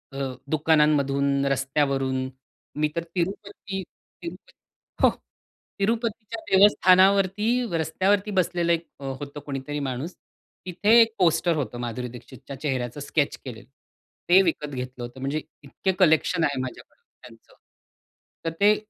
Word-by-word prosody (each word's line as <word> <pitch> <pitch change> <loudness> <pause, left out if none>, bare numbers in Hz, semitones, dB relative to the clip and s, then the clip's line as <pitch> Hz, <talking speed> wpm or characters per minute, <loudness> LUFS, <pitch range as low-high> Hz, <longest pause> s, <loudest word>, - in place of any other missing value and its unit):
अ, - - -5 0.3
दुकानांमधून, 140 -3 +2
रस्त्यावरून 135 -1 0 0.5
मी 150 - +3
तर 170 - -1
तिरुपती-तिरुपती 190 -1 -5 0.7
हो. - - +8 0.7
तिरुपतीच्या 225 +1 -2
देवस्थानावरती 195 +1 +5 0.3
रस्त्यावरती 190 +6 +1
बसलेलं 175 -2 +1
1 165 0 -2
अ, - - -11
होतं 140 +2 -6
कोणीतरी 145 +1 -4
माणूस, 135 +5 -4 0.5
तिथे 205 +6 +4
1 225 -1 +3
पोस्टर 170 -1 +3
होतं, 135 -4 -3
माधुरी 120 +1 -4
दीक्षितच्या 125 +3 -11
चेहऱ्याचं, 130 -2 -2
स्केच 145 +1 -1
केलेलं. 120 -2 -9 0.6
ते 190 +2 +8
विकत 160 -3 -1
घेतलं 125 -2 -6
होतं, 120 +2 -8
म्हणजे 140 +3 -2 0.2
इतके 145 +7 -2
कलेक्शन 160 +2 +3
आहे 140 -2 0
माझ्याकडे 130 - -9 0.2
त्यांचं. - - -16 0.9
तर 165 - 0
ते 210 +1 +6
155 Hz, 115 wpm, -25 LUFS, 135-190 Hz, 0.9 s, हो